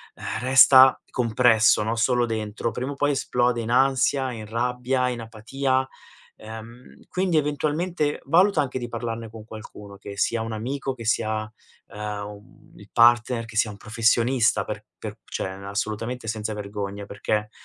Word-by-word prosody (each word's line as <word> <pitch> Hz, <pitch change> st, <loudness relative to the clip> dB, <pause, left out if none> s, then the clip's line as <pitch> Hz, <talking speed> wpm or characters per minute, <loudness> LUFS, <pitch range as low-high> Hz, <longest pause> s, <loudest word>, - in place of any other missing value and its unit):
ehm, -, -, -5 dB
resta 130 Hz, 0 st, +7 dB
compresso, 115 Hz, -2 st, +4 dB
no, 115 Hz, +2 st, -1 dB
solo 120 Hz, +1 st, +2 dB
dentro, 110 Hz, 0 st, -3 dB
prima 130 Hz, +3 st, -4 dB
o -, -, -11 dB
poi 145 Hz, +1 st, +1 dB
esplode 125 Hz, -3 st, 0 dB
in 115 Hz, +1 st, -4 dB
ansia, 130 Hz, 0 st, +2 dB
in 110 Hz, -2 st, -7 dB
rabbia, 125 Hz, +2 st, -1 dB
in 120 Hz, -2 st, -4 dB
apatia. 130 Hz, +4 st, -1 dB, 0.5 s
Ehm, 110 Hz, +3 st, -11 dB
quindi 180 Hz, -3 st, 0 dB
eventualmente, 150 Hz, +2 st, -1 dB
valuta 190 Hz, +4 st, +4 dB
anche 130 Hz, -2 st, -3 dB
di 120 Hz, -, -5 dB
parlarne 115 Hz, -1 st, -5 dB
con 110 Hz, -1 st, -11 dB
qualcuno, 105 Hz, -2 st, -11 dB
che 100 Hz, 0 st, -9 dB
sia 115 Hz, +2 st, 0 dB
un 115 Hz, -, -4 dB
amico, 135 Hz, +4 st, -3 dB
che 115 Hz, -3 st, -10 dB
sia, 110 Hz, -1 st, 0 dB, 0.4 s
uhm, 105 Hz, -1 st, -5 dB
un 105 Hz, 0 st, -14 dB
il -, -, -15 dB
partner, 120 Hz, 0 st, +4 dB
che 115 Hz, -1 st, -13 dB
sia 115 Hz, -3 st, +2 dB
un 100 Hz, -, -11 dB
professionista, 115 Hz, +2 st, +2 dB
per -, -, -6 dB, 0.2 s
per -, -, -7 dB
cioè, -, -, -4 dB, 0.2 s
assolutamente 110 Hz, +4 st, -4 dB
senza 110 Hz, 0 st, -3 dB
vergogna, 100 Hz, -1 st, -5 dB
perché 105 Hz, +1 st, -2 dB
115 Hz, 155 wpm, -24 LUFS, 110-130 Hz, 0.5 s, resta